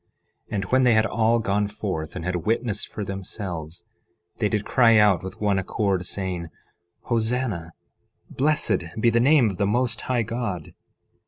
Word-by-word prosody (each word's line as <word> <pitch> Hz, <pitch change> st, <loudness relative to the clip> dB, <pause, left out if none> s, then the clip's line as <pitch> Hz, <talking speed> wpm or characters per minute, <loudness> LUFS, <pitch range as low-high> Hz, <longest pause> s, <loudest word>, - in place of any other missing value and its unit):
11:16 -, -, -4 dB
And 100 Hz, -, -1 dB
when 130 Hz, +7 st, +3 dB
they 125 Hz, -2 st, +5 dB
had 110 Hz, 0 st, +4 dB
all 115 Hz, +1 st, +2 dB
gone 105 Hz, -2 st, 0 dB
forth 95 Hz, -7 st, -4 dB
and 85 Hz, -2 st, -5 dB
had 90 Hz, 0 st, 0 dB
witnessed 110 Hz, +3 st, -1 dB
for 105 Hz, -, -6 dB
themselves, 90 Hz, -4 st, -6 dB, 0.5 s
they 105 Hz, -, +1 dB
did 105 Hz, -1 st, -1 dB
cry 115 Hz, -3 st, +5 dB
out 105 Hz, -4 st, +5 dB
with 95 Hz, 0 st, -8 dB
one 100 Hz, -2 st, +1 dB
accord, 95 Hz, -1 st, -1 dB
saying: 95 Hz, -3 st, -3 dB
11:17 -, -, -12 dB, 0.5 s
Hosanna! 115 Hz, -7 st, -1 dB, 0.6 s
Blessed 135 Hz, -, +1 dB, 0.2 s
be 115 Hz, +1 st, +4 dB
the 115 Hz, -, +3 dB
name 130 Hz, -3 st, +4 dB
of 95 Hz, -, -8 dB
the 100 Hz, -, +2 dB
Most 120 Hz, +2 st, 0 dB
High 125 Hz, -2 st, 0 dB
God! 115 Hz, -8 st, -4 dB
105 Hz, 170 wpm, -24 LUFS, 95-115 Hz, 0.6 s, they